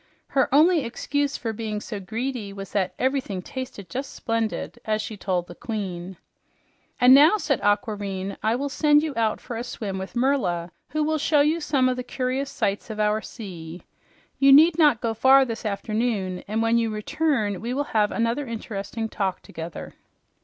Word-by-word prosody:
Her 270 - +1
only 315 +3 +5
excuse 285 +4 -2
for 225 -2 -3
being 215 -1 -3
so 210 0 -6
greedy 225 +2 -4
was 195 -1 -8
that 185 -3 -1
"ev'rything 255 -8 -1
tasted 255 -7 -7
just 265 +2 -5
splendid!" 230 0 -2
as 215 -1 0
she 215 0 -5
told 185 -3 -1
the 175 - -10
queen. 190 -4 -5 0.8
"And 250 +1 +8
now," 305 +9 +7
said 280 - -1
Aquareine, 205 -2 -1
"I 220 +2 +1
will 280 +3 -2
send 295 +1 +3
you 310 -3 -2
out 225 -1 +1
for 240 - -7
a 235 - -3
swim 205 -5 -5
with 190 +5 -7
Merla, 240 -10 0 0.2
who 305 0 0
will 310 +1 0
show 295 -1 +3
you 310 +3 +2
some 280 -4 +2
of 255 0 0
the 250 - -3
curious 260 +2 -2
sights 200 -3 -2
of 215 -1 -6
our 210 +1 +2
sea. 175 -8 -9 0.6
You 275 0 +6
need 310 +4 +8
not 295 -8 +5
go 230 -2 0
far 265 +4 +6
this 230 -2 -4
afternoon, 205 -2 -2
and 220 +2 0
when 230 +1 +3
you 230 -1 0
return, 215 - -1
we 235 +2 -3
will 280 +3 0
have 210 -2 +3
another 235 +4 -1
interesting 225 -1 -4
talk 190 -4 -2
together." 165 +1 -8
230 Hz, 180 wpm, -24 LUFS, 205-270 Hz, 0.8 s, And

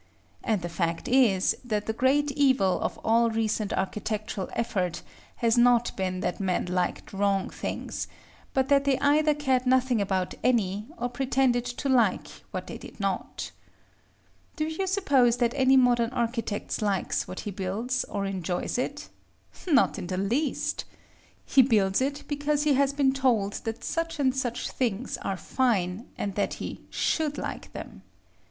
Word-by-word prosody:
And 215 -6 0
the - - -2
fact 170 -1 -2
is, 235 -8 +4
that 215 -4 -2
the 220 - -1
great 280 +5 +2
evil 260 -9 +3
of - - -2
all 230 +1 +4
recent 220 -2 -1
architectural 210 0 -3
effort 195 -7 -1 0.3
has 230 0 +2
not 240 0 +4
been 185 -1 -2
that 180 - -2
men 185 -2 0
liked 180 +1 -2
wrong 195 -1 +1
things: - - -4 0.4
but 265 -1 +1
that 280 0 +4
they 275 -2 +3
either 300 +1 +3
cared 265 -3 +1
nothing 255 -3 +3
about 190 -2 -1
any, 210 -4 +1
or 245 - -1
pretended 250 -1 +1
to 245 +3 -4
like 255 -3 +2 0.2
what - - -5
they - - -8
did - - -12
not. - - -3 1.0
Do 310 -2 -1
you 320 +5 -2
suppose 275 - +3
that 240 -1 +1
any 265 -1 +5
modern 240 -2 +4
architect 235 -4 -2
likes 200 -3 0
what 185 - -6
he 205 - -5
builds, 205 +7 -2
or 200 -1 -3
enjoys 185 +3 -2
it? 290 +3 -3 0.6
Not 285 -9 +3
in 180 - -5
the 185 0 -3
least. 240 +10 -1 0.6
He 270 - +6
builds 210 -5 +3
it 280 +2 -1
because 290 0 0
he 300 -2 +3
has 275 0 +3
been 280 -2 +2
told 235 -7 +1
that 225 0 -4
such 330 0 -2
and 260 -2 +2
such 245 -3 -2
things 240 -2 -2
are 195 - -3
fine, 210 -3 0
and 200 - -2
that 205 - -1
he - - -7
should 305 -2 0
like - - -5
them. - - -8
240 Hz, 160 wpm, -27 LUFS, 200-270 Hz, 1.0 s, He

